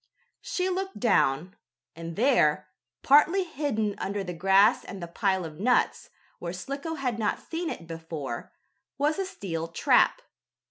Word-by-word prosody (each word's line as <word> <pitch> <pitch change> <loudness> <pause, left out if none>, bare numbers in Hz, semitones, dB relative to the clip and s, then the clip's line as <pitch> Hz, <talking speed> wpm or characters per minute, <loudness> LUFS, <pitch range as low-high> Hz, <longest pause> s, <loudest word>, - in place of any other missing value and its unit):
She 365 0 -2
looked 380 +1 -3
down, 180 - +2 0.4
and 165 0 -7
there, 155 - +3 0.3
partly 325 +7 +5
hidden 270 - -2
under 200 +1 -2
the 180 -1 -5
grass 195 +6 +4
and 195 - -8
the 175 - -5
pile 190 0 0
of 155 -1 -9
nuts, 245 +5 +1 0.3
where 170 0 -5
Slicko 280 - -5
had 250 -6 -2
not 210 -2 0
seen 335 0 -4
it 170 - -6
before, 160 -6 -6 0.5
was 295 +5 +1
a 385 - 0
steel 165 - -4
trap. 335 - +3
205 Hz, 145 wpm, -27 LUFS, -, 0.5 s, partly